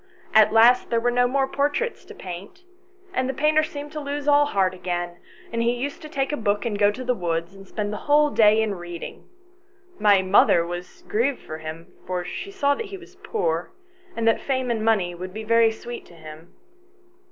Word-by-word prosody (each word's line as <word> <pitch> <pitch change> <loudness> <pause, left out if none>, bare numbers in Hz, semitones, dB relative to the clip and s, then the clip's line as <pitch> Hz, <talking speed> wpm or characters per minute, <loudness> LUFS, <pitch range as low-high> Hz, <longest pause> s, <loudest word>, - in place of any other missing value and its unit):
At 215 -1 +6
last 235 +3 +5
there 230 - +2
were 245 +1 +1
no 245 0 +3
more 270 +1 +1
portraits 290 - -1
to - - -12
paint, 190 - -9 0.5
and 260 -7 0
the 265 - -2
painter 305 +1 +3
seemed 295 -1 -6
to 310 - -5
lose 290 0 -4
all 290 0 +5
heart 190 -7 +1
again, 175 -1 -4 0.4
and 230 - 0
he 235 +1 +2
used 270 +4 -4
to 305 - -9
take 275 -2 -1
a 295 - -1
book 205 -2 0
and 210 -3 -2
go 205 -1 +5
to 250 +5 -5
the 250 0 +1
woods 170 -3 -3
and 195 0 -14
spend 210 0 -3
the - - -3
whole 295 0 +5
day 215 -2 +5
in 215 -2 -1
reading. 175 -2 -8 0.7
My 205 -2 +5
mother 185 -3 +4
was 175 +1 -8
grieved 250 +5 0
for 155 0 -7
him, 160 +1 -8
for 180 -1 -2
she 400 - -6
saw 285 -8 +1
that 435 +9 -5
he 395 -1 -7
was 370 0 -16
poor, 440 +3 -2 0.4
and 230 0 -1
that 225 - +3
fame 260 -2 -1
and 220 -2 -1
money 205 -6 +2
would 185 +2 -8
be 220 - -5
very 230 +1 +4
sweet 240 +2 -7
to 170 - -16
him. 160 +1 -12
225 Hz, 210 wpm, -24 LUFS, 185-280 Hz, 0.7 s, At